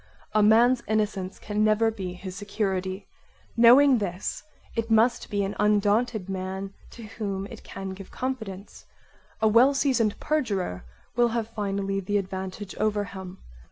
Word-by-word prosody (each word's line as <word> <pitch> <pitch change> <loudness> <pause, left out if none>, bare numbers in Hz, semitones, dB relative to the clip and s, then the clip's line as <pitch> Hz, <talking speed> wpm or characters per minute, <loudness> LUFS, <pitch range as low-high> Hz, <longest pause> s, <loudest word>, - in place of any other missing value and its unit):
A 215 - +4
man's 235 +4 +5
innocence 210 -3 -1
can 210 0 -1
never 215 +1 +3
be 190 -5 -5
his 185 0 -8
security; 195 -1 -3 0.5
knowing 250 +3 +7
this 185 -2 -3 0.3
it 230 0 -2
must 225 +2 +3
be 205 -1 0
an 195 +1 -3
undaunted 210 0 +2
man 190 +1 -4 0.2
to 235 - -10
whom 205 -3 -4
it - - -10
can 195 0 -7
give 190 0 -9
confidence; 220 -7 -6 0.6
a - - +6
well 245 +6 +5
seasoned 245 -7 +1
perjurer 210 - -1 0.3
will 240 0 +4
have 230 -1 -2
finally 200 -2 -2
the 205 +2 0
advantage 190 0 -5
over 210 -1 +1
him. 190 -2 -8
205 Hz, 145 wpm, -26 LUFS, 195-225 Hz, 0.6 s, knowing